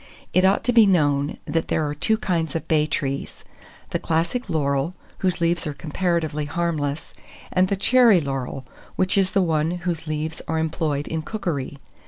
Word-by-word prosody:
It 185 - +4
ought 190 +3 +3
to 245 +1 +1
be 225 -3 +7
known, 145 -5 +2
that 160 +1 -1
there 155 - 0
are 145 - -2
two 220 +9 +2
kinds 165 -8 -1
of 165 - -3
bay 155 -2 +2
trees, 140 -2 -3 0.5
the - - 0
Classic 170 +10 -1
laurel, 140 +1 0 0.2
whose 185 -2 0
leaves 170 0 +1
are 150 - -4
comparatively 160 -2 -1
harmless, 150 -2 -2 0.4
and 185 0 +3
the 200 - 0
Cherry 230 0 +5
laurel, 135 -3 -4 0.3
which 185 0 +1
is 195 -2 +3
the 195 - +3
one 160 -2 +1 0.2
whose 165 -2 -2
leaves 155 +1 -3
are 160 - -1
employed 155 -2 -1
in 160 -1 -2
cookery. 155 -8 -4
160 Hz, 175 wpm, -23 LUFS, 150-185 Hz, 0.5 s, be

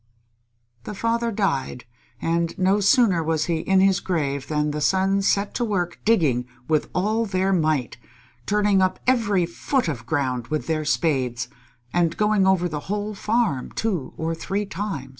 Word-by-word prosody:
The 210 - -6
father 230 +2 0
died, 140 - -1 0.3
and 170 0 -1
no 190 +2 +3
sooner 200 -3 +4
was 160 -1 0
he 170 -2 0
in 190 +3 +2
his 195 -1 +4
grave 140 -6 -2
than 150 -1 0
the 150 0 -3
sons 195 +5 +2
set 200 +1 +1
to 245 - -1
work 180 -6 -2
digging 150 - +2 0.2
with 155 -1 +1
all 215 +5 +1
their 190 0 +1
might, 155 - 0 0.5
turning 205 -2 +3
up 185 0 +1
every 210 -8 +2
foot 240 +8 -1
of 120 -8 -4
ground 125 -5 -1
with 155 -1 -2
their 155 -1 -1
spades, 130 -7 0 0.4
and 170 -2 +1
going 210 -2 +3
over 185 -2 +3
the 150 -3 -4
whole 210 +1 -2
farm 210 - 0
two 190 -11 -2
or 160 +1 -2
three 195 +5 -3
times. 195 -10 -5
180 Hz, 160 wpm, -23 LUFS, 155-205 Hz, 0.5 s, sooner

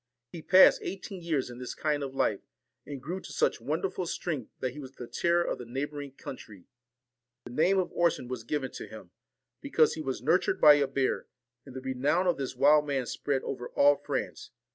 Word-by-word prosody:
He 170 - -8
passed 185 +4 +6
eighteen 195 -1 -6
years 155 -7 -1
in 120 - -10
this 125 - -6
kind 150 -2 -1
of 135 -1 -5
life, 105 -6 +1 0.5
and 145 -2 -6
grew 180 +5 -4
to - - -11
such - - 0
wonderful 190 - -2
strength, 150 -10 -3
that 130 - -2
he 150 - -10
was 135 -2 -9
the 125 - -8
terror 170 +8 +1
of - - -3
the 125 - -7
neighbouring 140 +2 -5
country. 110 -8 -10 0.8
The - - -9
name 180 +9 +3
of 185 -2 0
Orson 170 -7 +1
was 125 -2 -5
given 135 +2 -3
to - - -8
him, - - -12 0.5
because 165 - +3
he 160 - -5
was 130 -4 -4
nurtured 165 +6 +2
by 150 - +9
a 145 -1 +2
bear; 135 -1 -1 0.4
and 130 - -11
the 130 - -5
re 130 0 -3
nown 145 +8 +1
of 175 - +2
this 135 -2 -4
wild 150 +3 +5
man 135 -3 -1
spread 135 +2 -2
over 125 -2 -5
all 145 0 +5
France. - - -4
145 Hz, 205 wpm, -29 LUFS, 130-165 Hz, 0.8 s, by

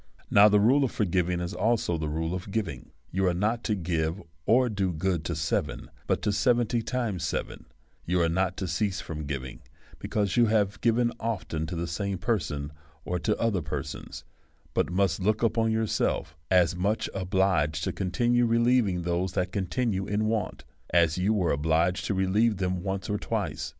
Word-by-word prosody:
Now, 105 +1 +8
the 105 0 +4
rule 130 +7 +4
of 130 - +1
forgiving 90 -3 0
is 85 0 -4
also 110 -5 +1
the 80 -1 -2
rule 80 +2 -2
of 90 +1 -5
giv 105 -1 -1
ing; 70 -6 -8 0.2
you 95 +1 +1
are 90 - +1
not 110 +6 0
to 105 - +1
give 85 -1 -1 0.3
or 125 +2 +5
do 100 -5 -1
good 85 0 -1
to 85 - -1
seven^ 75 -2 -2 0.2
but - - 0
to 105 - +2
seventy 120 +1 +2
times 110 -6 -2
seven; - - -3 0.4
you 90 +1 0
are 85 - +3
not 90 +2 0
to 95 - -3
cease 95 +2 -1
from 75 -3 -6
giv 70 -3 -3
ing, 65 - -10 0.4
because 100 -4 -1
you 120 -1 +5
have 105 -2 +1
given 120 0 +2
often 95 -8 -3
to 85 - -4
the 85 +1 -2
same 95 +4 -2
person 80 -9 -2 0.3
or 90 0 -1
to 105 +4 0
other 110 -6 +1
persons^ 75 -3 -6 0.5
but - - 0
must 95 -2 +1
look 105 +4 +1
upon 115 0 +2
yourself 110 -7 0
as 90 -2 +4
much 100 +5 0
obliged 95 -5 +1
to - - -1
continue 120 +6 +1
relieving 115 -6 +2
those 90 +1 -1
that 90 0 -1
continue 100 0 -1
in 105 +1 0
wants 110 -1 -2 0.2
as 85 0 +3
you 95 +4 +2
was 95 -6 +2
obliged 80 +5 +1
to 100 - -1
relieve 100 +3 +2
them 90 -1 -1
once 95 0 -3
or 105 0 -1
twice. - - -3
95 Hz, 185 wpm, -27 LUFS, 85-110 Hz, 0.5 s, Now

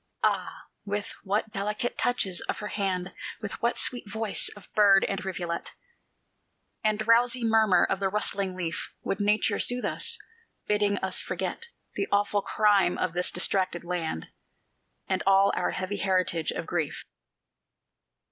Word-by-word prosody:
Ah, - - 0 0.2
with 205 0 -3
what 210 +2 -1
delicate 210 +4 -2
touches 195 -7 +1
of - - -1
her 210 - -5
hand, 190 -3 -2 0.3
With 210 -2 -6
what 235 +1 +1
sweet 245 -4 -1
voice 220 0 0
of 205 - -14
bird 200 -2 +6
and 195 -1 -2
rivulet 175 -3 -4 1.1
And 215 -1 +2
drowsy 235 +3 +3
murmur 220 -5 +4
of 195 - -1
the 195 -1 +1
rustling 195 -2 0
leaf 170 -2 -4
Would 195 - -2
Nature 210 0 +2
soothe 245 0 +2
us, - - +1 0.5
bidding 205 -1 +2
us 190 - -1
forget 185 - -4 0.3
The - - -2
awful 205 0 +2
crime 205 -4 +3
of 185 -2 -1
this 180 +1 +2
distracted 185 -1 +1
land 170 - -3 0.8
And 190 -1 0
all 195 0 +5
our - - 0
heavy 185 +2 -3
heritage 185 -4 0
of 165 - -2
grief. 160 -4 -3
200 Hz, 145 wpm, -27 LUFS, 185-210 Hz, 1.1 s, bird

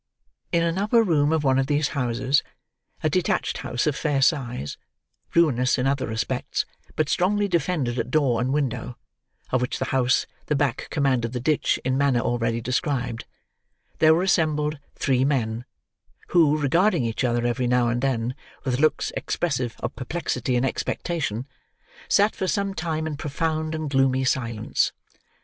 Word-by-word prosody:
In 170 -1 +2
an 170 +2 0
upper 225 +3 +4
room 155 -6 +2
of 160 -2 +1
one 135 -1 +3
of 135 - 0
these 145 0 +1
houses—a 130 0 -2
detached - - 0
house 120 - -2
of 150 -3 +1
fair 145 -2 0
size, 125 - 0 0.6
ruinous 130 -7 +3
in 125 - 0
other 135 0 0
respects, 110 0 -2 0.3
but 155 -1 +1
strongly 205 +6 +1
defended 160 -9 0
at - - -2
door 130 -5 +2
and 130 +1 0
window: 125 -4 -2 0.5
of 130 - +2
which 125 - -1
house 130 -1 +1 0.2
the 150 - +1
back 140 -3 0
commanded 130 -5 0
the 125 - -2
ditch 150 +4 +1
in 130 +1 +1
manner 140 -4 +3
already 115 -1 0
described—there 130 +4 -1
were 175 - +1
assembled 155 -4 +1 0.2
three 130 -2 +1
men, 120 -4 0 0.6
who, 155 -4 +4
regarding 155 - +2
each 115 +2 -2
other 120 -1 +1
every 120 +1 0
now 125 -1 +3
and 120 +1 -1
then 125 -3 0 0.3
with 125 -1 -1
looks 155 +1 +2
expressive 125 -8 -2
of - - -3
perplexity 125 -2 -2
and 125 +2 +2
expectation, 135 - -2 0.6
sat 205 +2 +4
for 190 - -2
some 200 0 0
time 160 -3 -2
in 155 -2 -3
profound 155 +1 -2
and 155 -2 -4
gloomy 135 -1 +3
silence. 115 -4 0
135 Hz, 155 wpm, -24 LUFS, 125-155 Hz, 0.6 s, upper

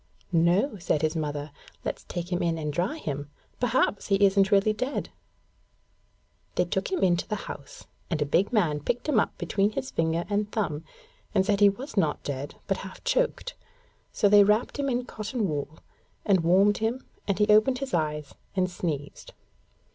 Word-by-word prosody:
'No,' 180 - +2
said 155 -3 0
his 155 +1 +1
mother; 145 -1 -3 0.3
'let's - - -4
take 175 0 -5
him 175 - 0
in 170 -1 0
and 150 -2 -3
dry 185 - -1
him. 145 - -4 0.3
Perhaps 245 -4 +1
he 200 - +3
isn't 195 0 +4
really 200 +2 +4
dead.' 255 +6 -3 1.5
They - - +2
took - - -2
him 370 - 0
into 175 -2 +2
the 215 - -1
house, 140 - -9 0.2
and 165 -3 -1
a 150 - +1
big 180 +7 +2
man 170 -10 +2
picked 240 - -2
him 280 -8 +4
up - - -1
between 205 +1 0
his 260 +4 -4
finger 165 +1 0
and 205 +1 -1
thumb, 160 -8 -2 0.5
and 190 -1 +4
said 200 -1 +2
he 205 -1 +7
was 240 +4 -7
not 155 -6 +1
dead 140 0 -4
but 195 - 0
half 190 -1 -9
choked; - - 0 0.6
so 205 - +2
they 205 0 +8
wrapped 210 +7 +1
him 280 -1 0
in 245 -1 -1
cotton 215 0 -3
wool, 150 0 -4 0.5
and 195 -3 +4
warmed 190 +5 +4
him 225 +4 -1 0.2
and 200 - +1
he 210 - +4
opened 215 +5 +5
his 275 0 -5
eyes 150 -3 -1 0.2
and 185 -1 +1
sneezed. 150 -5 -5
195 Hz, 180 wpm, -27 LUFS, 160-215 Hz, 1.5 s, they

